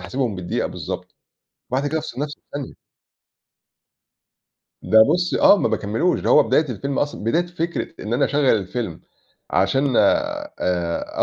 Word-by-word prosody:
حاسبهم 125 -6 -2
بالدقيقة 90 -1 -2
بالضبط، - - -7 0.6
وبعد 135 +3 0
كده 160 +2 -1
أفصِل 130 -2 -6
نفسي 150 -1 -5
في - - -59
ثانية. 145 -2 -5 2.1
ده 110 - +4
بُصّي، 180 0 0
آه 205 - +7
ما - - +1
باكمّلوش، 110 - 0
ده - - -1
هو - - +7
بداية 155 -1 +2
الفيلم 135 +4 -3
أصلًا، 145 -7 -2
بداية 170 +9 +1
فكرة 170 -1 -3 0.2
إن 110 - -4
أنا - - +2
أشغّل 145 0 0
الفيلم 100 -2 -4 0.5
عشان 135 -2 +1
آآ، 295 - 0
140 Hz, 145 wpm, -21 LUFS, 110-165 Hz, 2.1 s, آه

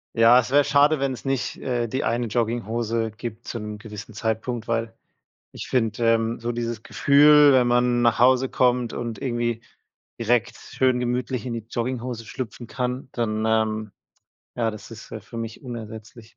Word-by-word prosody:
Ja, 115 +2 +7
es 125 - -2
wäre 145 +2 +5
schade, 145 +1 +4
wenn 135 -1 0
es 125 - -9
nicht, 135 -2 -2
äh, 120 -2 -2
die 130 +4 -2
eine 120 +1 0
Jogginghose 115 0 -1
gibt 115 +1 -8
zum 105 -2 -5
gewissen 105 0 -10
Zeitpunkt, 110 +1 -2
weil 115 0 -2 0.6
ich - - -8
finde, 115 -1 +2
ähm, 115 +1 -1
so 120 +1 -3
dieses 115 -2 -3
Gefühl, 145 +3 +6
wenn 130 -2 +4
man 120 0 +2
nach 120 -1 +3
Hause 130 +1 +5
kommt 125 -2 +1
und 120 -1 -5
irgendwie 120 -3 -1 0.6
direkt 115 0 +1
schön 130 -1 0
gemütlich 125 +1 -2
in 120 - -3
die 115 -2 -5
Jogginghose 120 -1 -3
schlüpfen 120 0 -7
kann, 125 +1 -3
dann, 110 -2 -1
ähm 110 -1 0 0.7
ja, 115 -2 +1
das 110 +1 -11
ist, 110 -1 -11
äh, 110 - -6
für 115 +4 -12
mich 115 -1 -6
unersetzlich. 115 -2 -9
120 Hz, 170 wpm, -24 LUFS, 115-125 Hz, 0.7 s, Ja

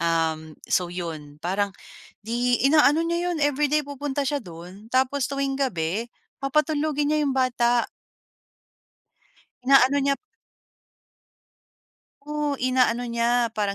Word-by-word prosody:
Um, 160 -2 -1
so 180 -1 +1
yun 160 -5 -6
parang 195 +3 0 0.6
'di 240 +3 0
inaano 300 +2 +5
niya 340 +1 -1
yun 335 - -3
everyday 290 +1 +2
pupunta 285 0 -3
siya 285 +1 -1
do'n. 180 +2 -12
Tapos 260 +2 +1
tuwing 275 -1 -2
gabi, 210 -3 -1 0.3
papatulugin 300 +1 0
niya 305 - +2
'yung 275 -2 0
bata. 240 -2 +2 1.8
Inaano 270 +1 +5
niya 275 0 +2 2.1
Oh 300 -1 -1
inaano 255 -2 +2
niya 235 0 +1
parang 205 -2 -2
255 Hz, 110 wpm, -24 LUFS, 205-285 Hz, 2.1 s, inaano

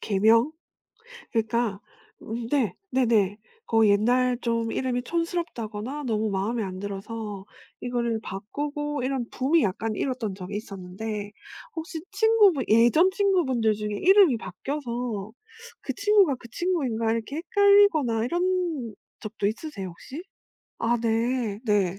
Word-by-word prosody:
개명? 225 +7 +3 0.8
그러니까 225 -3 0 0.4
음 230 +1 -5
네 255 -11 +1 0.2
네네 225 -6 +2 0.3
거의 225 -2 +4
옛날 245 +4 +3
좀 230 -1 -1
이름이 250 -1 -1
촌스럽다거나 295 - -3
너무 220 -3 0
마음에 205 +4 -1
안 185 -2 -5
들어서 205 0 -6 0.4
이거를 235 -2 -1
바꾸고 290 +9 -4
이런 260 -3 -2
붐이 290 +5 +2
약간 215 +3 -1
일었던 240 -4 -2
적이 190 +1 -6
있었는데 205 +1 -6 0.5
혹시 320 0 -5
친구분 425 - +4
예전 240 - +5
친구분들 325 - +2
중에 210 0 -4
이름이 370 - +5
바뀌어서 235 -6 -4 0.5
'그 - - -4
친구가 400 -8 +4
그 240 - -13
친구인가.' 255 -10 0
이렇게 230 +5 -3
헷갈리거나 400 - +4
이런 345 - -1 0.3
적도 215 -2 -3
있으세요? 215 -3 -4
혹시? 265 - -9 0.6
아 235 +1 +1
네. 230 -1 0
네. 195 -4 +1
235 Hz, 285 characters per minute, -26 LUFS, 215-295 Hz, 0.8 s, 예전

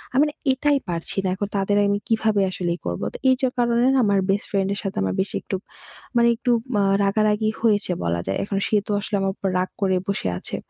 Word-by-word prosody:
আমি 275 - +6
না - - -10 0.2
এটাই 285 +2 +2
পারছি 170 +2 -4
না। - - 0
এখন 205 +1 -3
তাদের 200 +1 +1
আমি 200 0 +1
কীভাবে 220 -2 +2
আসলে 175 -2 -2
ই - - -34
করবো? 85 +3 -3
তো - - -6
এই 260 - +5
সব 260 - +1
কারণে 235 0 +2
না 265 - +3
আমার 200 -1 +3
বেস্ট 200 +1 +1
ফ্রেন্ডের 195 0 0
সাথে 195 -1 -4
আমার 95 -1 0
বেশি 195 - -4
একটু 195 - -4 0.6
মানে 235 0 +5
একটু 245 +2 -1 0.3
আ - - +3 0.2
রাগারাগি 215 +2 +2
হয়েছে 205 -5 +2
বলা 85 0 0
যায়। 95 - 0
এখন 195 0 -3
সে - - +1
তো - - -2
আসলে 210 0 -3
আমার 195 0 +1
উপর 195 - -2
রাগ 185 - -1
করে 190 -1 +2
বসে 200 - -1
আছে। - - -6
200 Hz, 230 wpm, -23 LUFS, 190-220 Hz, 0.6 s, আমি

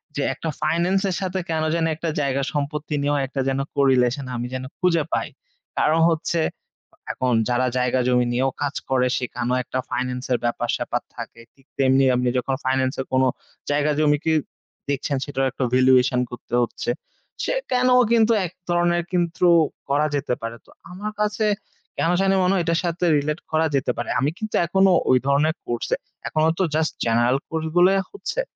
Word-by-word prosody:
যে 145 - -1
একটা 165 - -5
ফাইনান্স 170 +5 +1
এর 185 - -1
সাথে 190 0 -2
কেন 160 -1 0
যানি 165 -1 +1
একটা 165 +1 -3
জায়গা 140 -1 0
সম্পত্তি 150 +1 -3
নিয়েও 145 +1 +1
একটা 135 +1 -3
যেন 135 0 0 0.2
correlation 135 -1 +2
আমি 120 0 -3
যেন 130 0 -3 0.2
খুঁজে 170 -4 +2
পাই। - - 0 0.5
কারণ 160 +2 +3
হচ্ছে 165 +1 0 0.7
এখন 125 -1 0 0.2
যারা 125 +1 +2
জায়গা 125 +1 +1
জমি 125 -1 +3
নিয়েও 130 +2 +1
কাজ 145 -1 -1
করে, 130 -1 +2
সেখানেও 125 0 -2
একটা 130 - -3
ফাইনান্স 125 0 -2
এর 120 - +1
ব্যাপার 120 - -1
স্যাপার - - -2
থাকে। 115 - -8
ঠিক 135 - -27
তেমনি 135 0 +4
এমনি 125 0 +1
যখন 130 +2 0
ফাইনান্স 130 0 +1
এর - - -6
কোন 130 0 +4 0.5
জায়গায়-জমি, 150 0 +2
কি 160 - +3 0.6
দেখছেন, 140 0 -1
সেটারও 135 -2 -1
একটা 135 - -3
valuation 130 0 +4
করতে 120 - -10
হচ্ছে। 120 - -4 0.5
সে - - 0 0.2
কেন 255 0 +3 0.2
কিন্তু 230 -1 +4
এক 170 - -6 0.2
ধরণের 175 0 +2
কিন্তু 175 0 +1 0.4
করা 145 +2 +2
যেতে 140 -2 -1
পারে। 115 +1 -5
তো - - -23 0.2
আমার 205 +4 -5
কাছে 210 +1 0 0.5
কেন 165 - +1
জানি 195 0 +3
মনে 180 - +3
হয়, 180 - +1
এটার 165 0 +1
সাথে 175 +1 -1
রিলেট 150 +3 -1
করা 160 0 +2
যেতে 135 -2 +1
পারে। 120 - -4
আমি 135 +4 +2
কিন্তু 215 -1 -4
এখনো 190 +2 +3 0.2
ঐ - - +6 0.2
ধরনের 150 +3 +2
কোর্সে, 120 -1 -1 0.3
এখনো 155 +1 +2
তো - - +3
জাস্ট 155 0 +1
জেনারেল 120 +3 +3
কোর্স 160 -1 -2
গুলাই 190 +2 +5
হচ্ছে। 450 +4 -3
145 Hz, 175 wpm, -23 LUFS, 130-170 Hz, 0.7 s, ঐ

